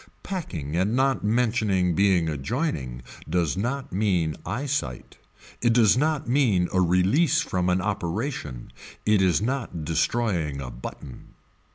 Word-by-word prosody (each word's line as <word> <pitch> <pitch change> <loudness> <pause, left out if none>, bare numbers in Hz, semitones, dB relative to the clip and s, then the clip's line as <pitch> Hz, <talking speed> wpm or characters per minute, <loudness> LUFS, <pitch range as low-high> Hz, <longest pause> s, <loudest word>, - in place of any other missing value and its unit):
Packing 85 - -4
and 95 +6 +1
not 135 +1 +1
mentioning 105 -5 +1
being 95 -2 +3
adjoining 70 - -3 0.3
does 85 -2 +1
not 125 +6 -3
mean 90 -6 +1
eye 130 +6 -2
sight. 130 - -4 0.4
It 120 -1 +3
does 115 -3 +5
not 150 +2 0
mean 120 -9 +3
a 95 - +3
release 100 - +3
from 90 - -1
an 90 +1 +2
operation. 95 - -3 0.3
It 105 -2 +4
is 95 +2 +2
not 115 - -3
destroying 80 -2 0
a 65 -2 -6
button. 65 +1 -10
95 Hz, 135 wpm, -25 LUFS, 85-125 Hz, 0.4 s, does